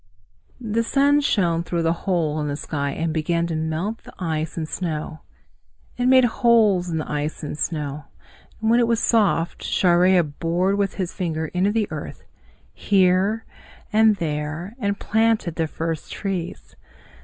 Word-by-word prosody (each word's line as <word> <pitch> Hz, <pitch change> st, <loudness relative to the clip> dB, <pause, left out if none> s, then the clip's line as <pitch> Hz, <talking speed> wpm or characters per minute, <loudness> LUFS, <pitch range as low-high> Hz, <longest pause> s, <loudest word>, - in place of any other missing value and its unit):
The 230 Hz, -1 st, -1 dB
sun 280 Hz, +4 st, +3 dB
shone 175 Hz, -, +1 dB
through 170 Hz, 0 st, -2 dB
the 165 Hz, 0 st, +2 dB, 0.2 s
hole 155 Hz, -4 st, +1 dB
in 150 Hz, -, -2 dB
the 145 Hz, -, -2 dB
sky 140 Hz, -1 st, -3 dB
and 160 Hz, +3 st, -2 dB
began 170 Hz, +2 st, 0 dB
to 170 Hz, -1 st, -3 dB
melt 160 Hz, +8 st, -2 dB
the -, -, -13 dB
ice 160 Hz, -3 st, -3 dB
and 160 Hz, -2 st, -2 dB
snow. 155 Hz, -2 st, -4 dB, 0.8 s
It 245 Hz, 0 st, 0 dB
made 260 Hz, 0 st, +6 dB
holes 220 Hz, -6 st, +3 dB
in 165 Hz, -, -2 dB
the 155 Hz, -, -3 dB
ice 150 Hz, +2 st, -3 dB
and 150 Hz, -, -4 dB
snow. 150 Hz, -2 st, -3 dB, 0.6 s
When 225 Hz, +2 st, +3 dB
it 235 Hz, -, +3 dB
was 230 Hz, -1 st, +2 dB
soft, 205 Hz, -8 st, +1 dB
Chareya 180 Hz, 0 st, +3 dB
bored 170 Hz, +6 st, -1 dB
with 200 Hz, -1 st, 0 dB
his 185 Hz, -3 st, -3 dB
finger 160 Hz, -4 st, -3 dB
into 185 Hz, +3 st, +1 dB
the 215 Hz, -1 st, 0 dB
earth, -, -, -7 dB, 0.5 s
here 195 Hz, +3 st, +2 dB, 0.5 s
and 220 Hz, 0 st, +5 dB
there, 155 Hz, +3 st, -4 dB
and 200 Hz, -3 st, -1 dB
planted 220 Hz, -5 st, +1 dB
the 160 Hz, 0 st, -1 dB
first 165 Hz, 0 st, -4 dB
trees. 190 Hz, -4 st, -5 dB
175 Hz, 155 wpm, -22 LUFS, 160-210 Hz, 0.8 s, made